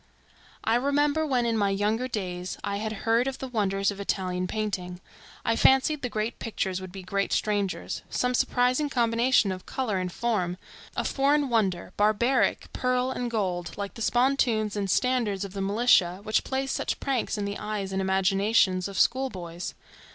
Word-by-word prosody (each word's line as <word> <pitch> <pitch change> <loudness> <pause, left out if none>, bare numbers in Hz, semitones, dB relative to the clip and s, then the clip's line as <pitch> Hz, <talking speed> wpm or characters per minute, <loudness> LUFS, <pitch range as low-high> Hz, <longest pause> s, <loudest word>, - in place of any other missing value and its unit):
I 225 +1 +3
remember 290 +4 +1
when 250 -4 +1
in 230 -1 +1
my 205 -2 +2
younger 210 +5 0
days 185 -6 -4
I 200 - -2
had 215 +1 -3
heard 230 +3 +3
of 270 - -3
the 265 - -5
wonders 200 -4 0
of 200 - -9
Italian 185 -2 -1
painting, 185 -4 -3 0.5
I 230 - +2
fancied 270 +5 +4
the 245 - -2
great 215 +1 -3
pictures 190 -5 -2
would 185 -1 -8
be 190 0 -8
great 200 +2 -1
strangers; 205 -3 -1
some 250 0 0
surprising 250 +4 +2
combination 235 -3 +3
of 185 -1 -7
color 225 -8 -1
and 180 -1 -3
form; 185 -6 -1 0.4
a - - +1
foreign 280 +1 +2
wonder, 190 -6 0
barbaric 215 +5 +2
pearl 255 0 0
and 245 -2 -3
gold, 185 -6 -2
like 200 -1 -4
the 230 - -10
spontoons 240 -4 +2
and 200 -2 -2
standards 220 -4 +1
of 190 - -9
the 200 - -4
militia, 195 -3 +3
which 215 0 +1
play 265 +1 -2
such 270 - -2
pranks 265 -5 -1
in 205 - -2
the 200 0 -4
eyes 205 -2 -3
and 190 - 0
imaginations 190 0 +2
of 200 -1 -7
school 265 +2 +3
boys. 175 -4 -7
215 Hz, 175 wpm, -27 LUFS, 195-250 Hz, 0.5 s, fancied